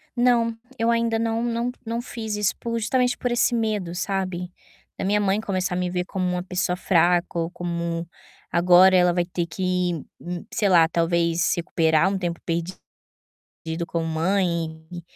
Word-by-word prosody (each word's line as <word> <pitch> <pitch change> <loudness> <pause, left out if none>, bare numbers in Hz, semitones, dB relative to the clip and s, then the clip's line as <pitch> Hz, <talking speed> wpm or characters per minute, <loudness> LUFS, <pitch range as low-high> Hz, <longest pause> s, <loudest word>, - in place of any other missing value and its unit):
Não, 240 -2 +3 0.2
eu 230 +1 +2
ainda 230 -1 +1
não 230 0 0
não 240 +1 -1
não 230 +1 -2
fiz 225 -3 -5
isso 210 -2 0
por 230 0 -2
justamente 245 +3 +1
por 245 -2 -2
esse 240 +1 +2
medo, 215 -6 -1
sabe. 185 -1 -2 0.5
Da - - -3
minha 210 +1 +2
mãe 200 +1 +1
começar 185 -4 -2
a - - -1
me 180 -1 -1
ver 180 0 -2
como 185 -1 -3
uma 180 0 -1
pessoa 180 -1 -1
fraca 175 -1 +2
ou 165 +1 -2
como 170 -1 -3 0.4
agora 180 +2 +6
ela 180 -1 +4
vai 175 0 +1
ter 175 -1 -2
que 180 +1 -1 0.3
hum, 175 0 -6
sei 205 - +1
lá, 170 -3 +6
talvez 170 0 +1
recuperar 165 0 +2
um 195 - -1
tempo 175 -2 -3
perdido 170 +2 -4 0.9
com 165 -1 -2
mãe 165 -1 -1
e 175 -1 -7
180 Hz, 170 wpm, -24 LUFS, 170-215 Hz, 0.9 s, agora